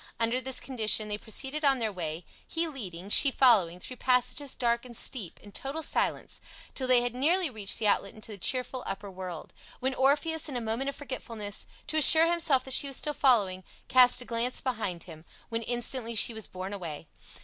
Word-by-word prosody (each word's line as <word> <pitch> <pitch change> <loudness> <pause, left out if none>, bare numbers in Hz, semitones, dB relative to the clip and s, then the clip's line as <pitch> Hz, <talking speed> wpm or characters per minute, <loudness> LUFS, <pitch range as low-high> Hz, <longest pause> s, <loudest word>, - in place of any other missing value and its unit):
Under 230 +2 +1
this 265 0 +2
condition 220 -4 +1
they 210 - -1
proceeded 270 +8 -2
on 275 -2 +3
their 225 -3 -2
way, 165 -3 -6 0.2
he 330 0 -1
leading, 200 - -7
she 280 - +6
following, 210 -11 +3
through 255 +7 -9
passages 255 +3 0
dark 235 -1 0
and 240 -2 -5
steep, 215 -10 +1
in 205 - -14
total 280 +9 -5
silence, - - -1 0.3
till 260 - 0
they 250 -1 +5
had 245 -1 -3
nearly 320 +5 +2
reached 210 -4 0
the 220 - -3
outlet 200 -1 +1
into 215 0 -8
the 205 - -10
cheerful 255 +5 -1
upper 195 0 -6
world, 180 -3 -9 0.3
when 265 +1 -1
Orpheus, 295 +5 +1
in 265 - -4
a - - -2
moment 230 +4 -3
of 280 - -6
forgetfulness, 230 -7 -5 0.2
to 315 - -2
assure 315 +2 +9
himself 330 -6 +2
that 265 - -2
she 280 - +5
was 275 - -2
still 300 - -2
following, 205 -10 +1 0.3
cast 250 -1 +6
a - - -9
glance 235 +2 -1
behind 215 - -4
him, 160 -3 -13 0.3
when 230 0 -3
instantly 240 0 0
she 225 +2 +4
was 220 -1 -5
borne 185 +2 -7
away. 165 -6 -7
240 Hz, 200 wpm, -28 LUFS, 205-270 Hz, 0.3 s, assure